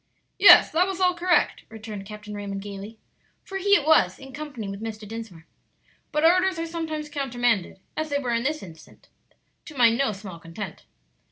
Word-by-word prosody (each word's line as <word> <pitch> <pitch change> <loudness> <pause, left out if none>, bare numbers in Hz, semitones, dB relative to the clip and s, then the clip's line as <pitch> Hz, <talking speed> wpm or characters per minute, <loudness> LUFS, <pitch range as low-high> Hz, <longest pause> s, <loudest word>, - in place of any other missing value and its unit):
"Yes, 400 - +9
that 355 +4 +3
was 385 -1 -4
all 365 -1 +3
correct," 350 0 +1
returned 215 -3 -8
Captain 210 0 -9
Raymond, 200 -1 -5
gayly, 205 +2 -8 0.5
for 385 0 -5
he 405 +1 +4
it 290 - +1
was, 190 - +4
in 270 0 -12
company 290 -8 -6
with 195 +1 -6
Mr. 215 -1 -6
Dinsmore; 220 -7 -8 0.7
"but 300 +1 +1
orders 365 +2 +4
are 330 - -2
sometimes 320 -2 -4
countermanded, 245 -10 -1 0.2
as 310 0 -3
they 285 - 0
were 250 -4 -2
in 230 - +1
this 300 +5 -2
instance, 160 -3 -15 0.6
to 305 - -11
my 235 -2 +6
no 235 0 +1
small 190 -4 -9
content." 165 +2 -8
240 Hz, 180 wpm, -25 LUFS, 205-315 Hz, 0.7 s, Yes